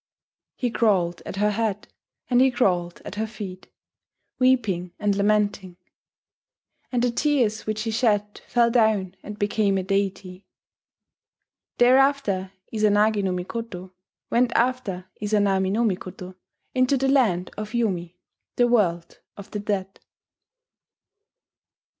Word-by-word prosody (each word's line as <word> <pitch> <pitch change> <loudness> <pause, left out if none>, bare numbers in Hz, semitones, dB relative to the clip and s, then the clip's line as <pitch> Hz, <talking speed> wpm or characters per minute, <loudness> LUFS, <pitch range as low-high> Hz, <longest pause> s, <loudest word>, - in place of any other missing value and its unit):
He 245 -2 -2
crawled 185 -7 +1
at - - -5
her 210 +1 +2
head 210 -1 -2 0.4
and 250 -1 +3
he 265 - +6
crawled 180 -8 0
at - - -6
her 220 +2 -2
feet, 200 -4 -9 0.7
weeping 220 -9 +1
and 205 -1 +1
lamenting; 200 -3 0 1.1
and 245 -2 0
the 245 - +2
tears 235 -6 0
which 215 0 -2
he 225 - -2
shed 210 -3 0
fell 235 -1 +3
down 215 -6 +2
and 210 0 -8
became 205 -1 +1
a 190 - -1
deity.... 195 -1 -2 1.3
Thereafter 250 -7 +3 0.2
Izanagi 210 -1 +3
no 190 - 0
Mikoto 185 0 -5 0.4
went 240 0 +3
after 235 -7 0
Izanami 200 -2 +1
no 225 +4 +1
Mikoto 185 -3 -3 0.4
into 255 +2 +2
the 270 +1 0
Land 220 -10 +2
of 215 +2 -6
Yomi, 180 -7 -1 0.4
the 245 - +3
world 175 -8 0 0.2
of 200 - -11
the 210 - -3
dead. 195 -2 -3
210 Hz, 125 wpm, -24 LUFS, 190-235 Hz, 1.3 s, he